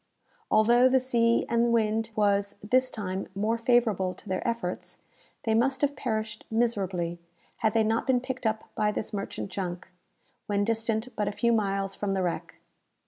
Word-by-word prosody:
Although 240 +4 +5
the 260 0 +4
sea 235 -2 +2
and 235 0 +2
wind 220 -1 +1
was, 200 -1 +2
this 255 +4 +2
time, 190 -3 -4
more 220 +3 0
favourable 225 -6 +2
to - - -13
their 185 +3 -2
efforts, 230 -6 -3 0.4
they 220 - +1
must 260 +4 +2
have 285 0 +1
perished 220 -3 -3
miserably, 190 -7 0 0.4
had 215 - +1
they 225 - +5
not 225 +1 0
been 260 -2 +4
picked 255 -1 -3
up 220 0 -1
by 210 -1 +1
this 210 - -4
merchant 200 -1 -4
junk, 185 -1 -4 0.6
when 205 -1 +1
distant 225 +2 -1
but 210 -1 -1
a - - 0
few 235 +3 +1
miles 195 -2 0
from 195 0 -2
the 190 -1 0
wreck. 175 -2 -3
220 Hz, 170 wpm, -28 LUFS, 200-235 Hz, 0.6 s, Although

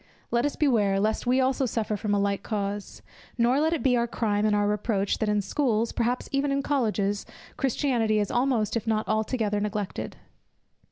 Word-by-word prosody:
Let 235 +4 +2
us 290 - -4
beware, 210 -9 +2
lest 215 +3 0
we 255 +2 +3
also 265 0 +1
suffer 220 -2 -1
from 205 0 -1
a - - +2
like 200 0 0
cause; 205 -1 -4 0.3
nor 245 +3 +3
let 315 +2 +2
it 335 - -1
be 260 -3 +4
our 235 0 +1
crime 215 -2 0
and 210 - +2
our 205 0 +2
reproach, 205 -1 0
that 220 - 0
in 210 -1 +1
schools, 230 0 0
perhaps 245 +1 -1
even 275 +1 +1
in 275 0 0
Colleges, 210 -8 0 0.3
Christianity 245 -5 +1
is 205 -1 0
almost 240 -4 +1
if 230 -1 -2
not 220 -1 0
altogether 215 -1 0
neglected. 210 -1 -4
220 Hz, 185 wpm, -26 LUFS, 205-255 Hz, 0.3 s, be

